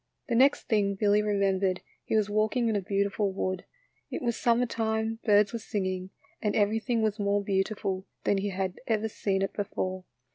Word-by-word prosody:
The - - 0
next 265 +4 +4
thing 205 -3 +1
Billy 205 +1 +3
remembered 195 -2 +1 0.2
he - - -1
was 215 -2 +3
walking 215 +3 +1
in 220 - +1
a 200 - +1
beautiful 200 +1 0
wood. 185 -1 -3 0.4
It - - -4
was 235 -2 0
summer 235 +2 +2
time, 225 -1 -1
birds 210 0 +4
were 230 - -2
singing 185 -4 -3 0.3
and 210 -1 0
everything 220 +2 +1
was 215 0 0
more 200 0 +1
beautiful 195 -1 -1 0.2
than 200 - +2
he 205 +1 -1
had 190 -1 -3
ever 220 -1 +1
seen 195 -2 -1
it 195 - -2
before. 185 -2 -3
205 Hz, 180 wpm, -28 LUFS, 195-220 Hz, 0.4 s, next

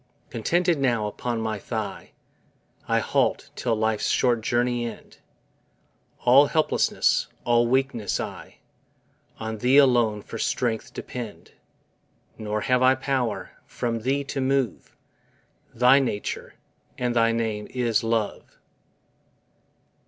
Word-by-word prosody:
Contented 170 +7 +1
now 120 -5 +1
upon 115 +3 -3
my 110 -2 -2
thigh - - -5 0.7
I - - +2
halt, - - 0
till 120 -2 0
life's 110 0 0
short 120 -3 +2
journey 120 +1 0
end; - - -11 1.0
All 135 +4 +6
helplessness, 155 0 +1 0.2
all 120 0 +3
weakness 130 -4 0
I, - - -7 0.8
On 110 -1 -5
Thee 125 +5 +4
alone 120 -7 +4
for 115 - -8
strength 115 -1 -1
depend, 120 -4 -7 0.8
Nor 105 0 -3
have 125 +2 +2
I 130 +1 +5
power, 130 -3 -2 0.2
from 115 -1 -3
Thee, 135 +5 0
to 135 0 -4
move; 130 -5 -1 0.8
Thy 125 +3 +5
nature, 120 -6 -3 0.4
and 125 -1 -1
thy 115 -1 +4
name 110 -2 -2
is 120 -4 0
LOVE. 115 -2 -2
120 Hz, 115 wpm, -25 LUFS, 110-130 Hz, 1.0 s, All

